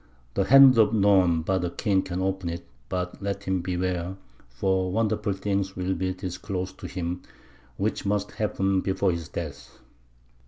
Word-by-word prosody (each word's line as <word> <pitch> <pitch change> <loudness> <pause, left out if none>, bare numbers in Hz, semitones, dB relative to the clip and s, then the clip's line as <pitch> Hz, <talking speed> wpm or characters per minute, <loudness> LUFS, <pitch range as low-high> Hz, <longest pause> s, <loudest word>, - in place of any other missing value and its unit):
The 95 - +1
hand 135 0 +8
of 110 0 +4
none 95 -5 +4
but 95 +1 0
a 90 - 0
king 95 +2 +1
can 95 0 -3
open 95 -2 -1
it; 85 0 -6 0.2
but 90 +1 -3
let 100 0 -3
him 95 -2 0
beware, 90 0 -2 0.3
for 95 +8 0
wonderful 105 -1 0
things 100 0 -2
will 95 +1 -1
be 95 +1 -1
disclosed 95 0 -5
to - - -6
him, 90 0 -4 0.6
which - - -1
must 105 +1 -1
happen 95 -2 0
before 95 0 +1
his 85 -3 -5
death." - - -7
95 Hz, 160 wpm, -26 LUFS, 90-100 Hz, 0.6 s, hand